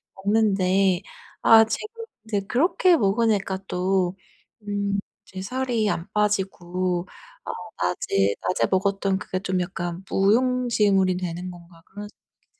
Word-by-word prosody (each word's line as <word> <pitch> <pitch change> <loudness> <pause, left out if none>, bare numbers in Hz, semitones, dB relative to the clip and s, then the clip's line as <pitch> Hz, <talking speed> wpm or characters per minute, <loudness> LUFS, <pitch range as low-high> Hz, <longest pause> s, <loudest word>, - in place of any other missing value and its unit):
먹는데 195 -2 +2 0.4
아 225 -1 +8
지금 445 - -5 0.2
이제 210 -3 -1
그렇게 335 - +3
먹으니까 200 -2 +1
또 185 0 0 0.5
음 200 -1 -1 0.3
이제 190 - -10
살이 250 -2 -1
안 170 -2 -2
빠지고 185 -4 -1 0.4
아 - - -3 0.3
낮에 100 +1 +1
낮에 185 - +1
먹었던 195 0 +1
그게 185 - -4
좀 185 -1 -1
약간 175 0 -4
무용지물이 210 -3 +2
되는 180 0 -4
건가 170 -1 -15
그런 205 +1 -9
생각이 - - -29
드는 - - -44
195 Hz, 255 characters per minute, -24 LUFS, 185-215 Hz, 0.5 s, 아